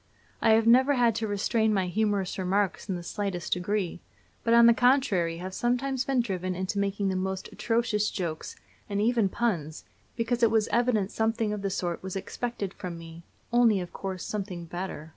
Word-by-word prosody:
I 220 - +5
have 220 0 +4
never 260 +5 +5
had 240 -2 +3
to 225 - -1
restrain 215 +2 +1
my 190 -1 +1
humorous 200 0 -1
remarks 195 +2 0
in 190 - 0
the 175 - -6
slightest 185 -2 -2
degree, 180 -1 -2 0.4
but 230 0 +4
on 235 0 +8
the 235 - +8
contrary 230 -10 +2
have 185 +2 -6
sometimes 255 +4 0
been 270 -2 +2
driven 185 -5 -3
into 185 +2 -2
making 200 0 0
the 190 - -1
most 190 0 -3
atrocious 225 -3 0
jokes, 170 -5 -4 0.3
and 200 0 -1
even 225 -2 +2
puns, 170 -10 -2 0.3
because 235 +1 -1
it 230 - +6
was 220 -1 +2
evident 230 -5 +1
something 225 -1 0
of 210 - -4
the 195 - -1
sort 175 -3 -2
was 190 0 -6
expected 200 0 -4
from 175 -2 -6
me 165 0 -10 0.3
only, 235 -4 +5
of 175 -1 -6
course, 190 -2 -5
something 190 -5 -4
better. 170 -2 -6
205 Hz, 185 wpm, -28 LUFS, 185-230 Hz, 0.4 s, on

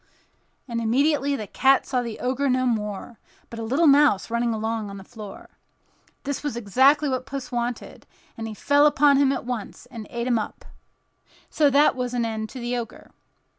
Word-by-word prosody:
and 235 -2 -3
immediately 280 +4 +1
the 215 - -5
cat 270 +6 +3
saw 255 -2 -1
the 230 -3 -6
Ogre 265 +2 -1
no 255 0 +1
longer, 215 -1 -3 0.3
but 230 - -7
a - - -4
little 270 +9 +1
mouse 280 -8 +4
running 235 0 0
along 220 -1 -3
on 200 - -8
the 195 - -10
floor. 210 -1 -11 0.8
This 285 -1 -3
was 290 -5 -4
exactly 265 +7 +3
what 260 -1 -2
Puss 275 -2 -6
wanted; 240 -1 -4 0.3
and 225 0 -6
he 220 - -7
fell 285 +6 +4
upon 290 -2 +4
him 275 -1 +3
at 275 - -3
once 245 -2 -6
and 225 -4 -8
ate 235 0 -4
him 240 -3 +2
up. 215 - -7 0.9
So 295 -2 +3
there 285 +2 +4
was 250 -1 -3
an 235 -1 0
end 220 -1 -4
to 260 - -8
the 240 +1 -2
Ogre. 235 -2 -7
245 Hz, 190 wpm, -24 LUFS, 225-275 Hz, 0.9 s, mouse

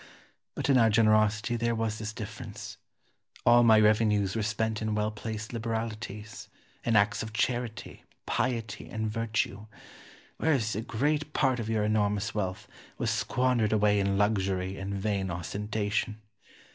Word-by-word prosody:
But - - -2
in 135 -2 +5
our 115 -1 +5
generosity 110 +1 +3
there 115 0 0
was 110 -1 -2
this 105 0 -4
difference 110 0 -8 0.7
all 120 0 +7
my 110 -2 +6
revenues 105 -2 +3
were 110 - 0
spent 110 +1 -1
in 110 -1 -1
well 105 0 0
placed 110 +1 -6
liberalities, 110 -2 -4 0.4
in 115 - +1
acts 105 0 +3
of 110 -1 -6
charity, 120 0 -2 0.2
piety, 115 -4 -2
and 110 -1 -2
virtue; 110 -2 -2 0.7
whereas 130 -10 +1
a 110 - -1
great 150 +7 -1
part 130 -3 +2
of 110 -1 -4
your 110 -2 +1
enormous 105 +1 +1
wealth 95 -3 -3 0.3
was - - 0
squandered 125 -4 +1
away 105 -1 +3
in 100 0 +1
luxury 95 -2 0
and 100 +1 -4
vain 100 -1 -1
ostentation. 105 +5 -2
110 Hz, 145 wpm, -29 LUFS, 105-115 Hz, 0.7 s, all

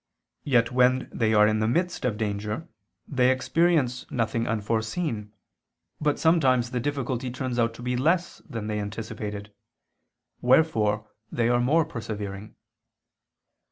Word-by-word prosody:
Yet 120 -4 +3
when 125 +1 +3
they 110 -2 +1
are 105 0 +7
in 110 0 +1
the 110 - +1
midst 175 +5 0
of 115 -4 0
danger, 105 +5 -3 0.4
they 130 -2 +3
experience 130 -1 +1
nothing 115 -1 -1
unforeseen, 110 - -2 0.7
but 150 -1 +1
sometimes 130 -7 +3
the 125 - -1
difficulty 130 -2 -2
turns 125 -1 -3
out 115 0 +1
to 120 - -10
be 125 0 -1
less 170 +7 +1
than 115 -3 -5
they 105 0 -2
anticipated; 105 0 -6 0.9
wherefore 110 -6 +3 0.2
they 120 0 +1
are 120 0 +3
more 155 +6 +3
persevering. 105 -6 -6
120 Hz, 130 wpm, -26 LUFS, 110-130 Hz, 0.9 s, are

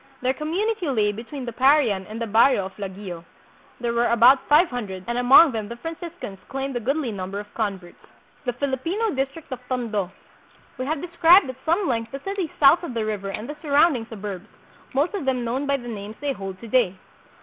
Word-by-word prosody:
Their 255 +1 +2
community 360 +6 -2
lay 215 -5 +2
between 240 +6 -7
the 235 - -5
Parian 255 -8 +3
and 220 +1 -7
the 230 - -2
barrio 225 -1 +4
of 190 0 -9
Laguio. 190 -3 -7 0.6
There 235 -1 -1
were 235 +1 +2
about 240 +4 +5
five 310 +5 +6
hundred, 200 -7 -5
and 240 - -2
among 260 +6 +7
them 220 -3 -4
the 235 - -7
Franciscans 325 - -7
claimed 270 0 -4
a - - 0
goodly 265 +2 -1
number 195 0 -5
of 205 0 -10
converts. 195 -5 -4 0.4
The 245 - -1
Filipino 290 - -1
District 275 +1 -4
of 255 - -4
Tondo. 220 -7 -1 0.7
We 255 - -3
have 305 -1 -1
described 340 -2 +5
at 260 +1 -20
some 345 +4 +1
length 230 -2 -1
the 275 - -5
city 390 -3 -3
south 280 +3 +6
of 305 -9 -6
the 225 -1 -1
river 205 -2 -3
and 215 +4 -5
the 295 - -6
surround 295 0 +4
ing 225 -2 -5
suburbs, 205 -2 -7 0.5
most 290 +8 +1
of 390 -9 -3
them 255 -2 0
known 260 +5 -2
by 280 0 +2
the 240 -2 -10
names 210 -1 -6
they 285 -1 -1
hold 195 -4 -7
to 230 - -8
day. 220 -5 +2
245 Hz, 205 wpm, -24 LUFS, 215-290 Hz, 0.7 s, among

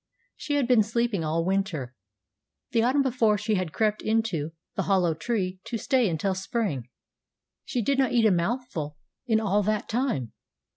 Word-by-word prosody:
She 290 - -3
had 280 -4 +2
been 245 -3 +5
sleeping 225 -3 0
all 165 +2 0
winter. 185 - -1 0.8
The 230 - +3
autumn 260 +4 +3
before 230 -5 +2
she 215 +2 -1
had 185 -5 -1
crept 215 +3 0
into 220 -9 0 0.2
the - - -1
hollow 180 -4 +3
tree 185 +2 -2
to 235 - -3
stay 255 -2 +2
until 185 +4 0
spring. 185 - -2 0.8
She 250 -7 -1
did 275 +4 +1
not 265 -2 +3
eat 235 -2 +3
a 215 - +6
mouthful 170 - -2 0.3
in 220 -2 +3
all 205 -1 +2
that 215 +1 -1
time. 220 - -1
215 Hz, 165 wpm, -26 LUFS, 175-240 Hz, 0.8 s, a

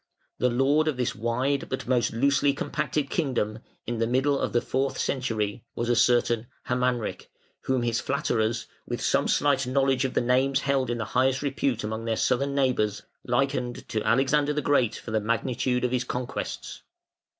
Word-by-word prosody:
The 125 - +3
lord 140 +6 +2
of 150 -5 0
this 125 -2 0
wide 125 +5 -1
but 130 - -4
most 125 -3 +2
loosely 140 +4 +2
compacted 145 0 -2
kingdom, 120 -9 -1 0.3
in 120 -1 -3
the 115 - +1
middle 135 +3 +2
of - - -1
the 120 - +3
fourth 135 +2 -1
century, 110 -5 -1
was 120 0 -2
a 120 - +3
certain 120 0 +3 0.2
Hermanric, 125 -2 -1 0.4
whom 130 -2 +1
his 115 -1 0
flatterers, 115 -5 0 0.2
with - - -3
some - - +1
slight 140 -3 +2
knowledge 135 0 +2
of 130 - -2
the - - +4
names 130 +3 +2
held 135 -3 +1
in 120 0 -2
highest 130 +5 +1
repute 135 -4 -1
among 110 +1 -4
their 115 -1 0
Southern 140 +2 +1
neighbours, 125 -7 +1 0.2
likened 125 -1 -1
to 110 - -1
Alexander 140 +5 +2
the 150 - -2
Great 130 -6 +2
for 115 - -8
the 110 -1 +1
magnitude 125 +3 0
of 125 - -1
his 125 -1 +1
conquests. 125 0 -5
125 Hz, 175 wpm, -26 LUFS, 120-135 Hz, 0.4 s, the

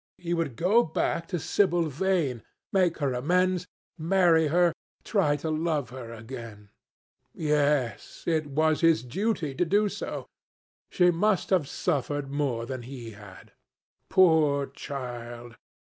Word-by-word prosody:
He 175 -1 -3
would 165 -8 -1
go 195 - +4
back 165 -2 -1
to 180 - -2
Sibyl 175 +1 +2
Vane, 155 -5 0 0.3
make 185 -4 +2
her 140 -4 0
amends, 180 +7 +1 0.3
marry 165 -1 +4
her, 175 +2 +3 0.3
try 185 -9 +2
to 155 +2 -3
love 155 -6 -1
her 125 -3 -8
again. 115 -3 -9 0.6
Yes, 145 -6 0
it 160 -3 0
was 155 +3 +1
his 165 -8 +4
duty 160 - -2
to 135 - +1
do 205 +4 +2
so. - - -5 0.6
She 180 -1 +4
must 195 +3 +1
have 180 -7 +3
suffered 145 0 -2
more 135 -5 -1
than 130 0 -5
he 120 -2 -8
had. 105 -3 -14 0.6
Poor 155 -6 +4
child! 120 -4 -7
150 Hz, 130 wpm, -27 LUFS, 130-175 Hz, 0.6 s, go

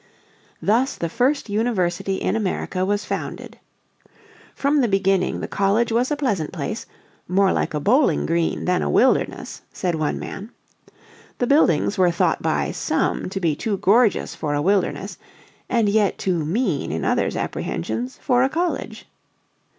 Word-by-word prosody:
Thus 245 +6 +2
the 170 - -3
first 255 - +1
University 195 -4 0
in 190 - -1
America 185 -3 -2
was 205 +1 -1
founded. - - -5 1.0
From 280 +1 +2
the 245 - +2
beginning 195 -2 +1
the - - -3
college 205 +4 +1
was 240 +3 +1
a 295 - 0
pleasant 210 - -1
place, - - -5 0.4
"more 190 +2 +3
like - - -1
a - - 0
bowling 255 - +3
green 165 0 0
than 180 - +1
a 75 - -1
wilderness," - - +1
said 180 -2 -2
one 155 -2 -1
man. 200 +3 -7 0.9
"The 245 - 0
buildings 210 - +3
were 180 -1 +5
thought 170 - +1
by - - 0
some - - -1
to 195 - -4
be 165 -5 +1
too 210 +3 -2
gorgeous 215 +3 +3
for 145 -2 -2
a 145 - 0
wilderness, 195 +1 0 0.5
and 230 -3 +2
yet 205 -1 +2
too 175 -5 -1
mean 180 - -1
in 80 +1 -2
others' - - +1
apprehensions 110 +9 -3
for 245 -2 +3
a 265 - +3
college. 345 +4 -3
195 Hz, 155 wpm, -22 LUFS, 175-235 Hz, 1.0 s, were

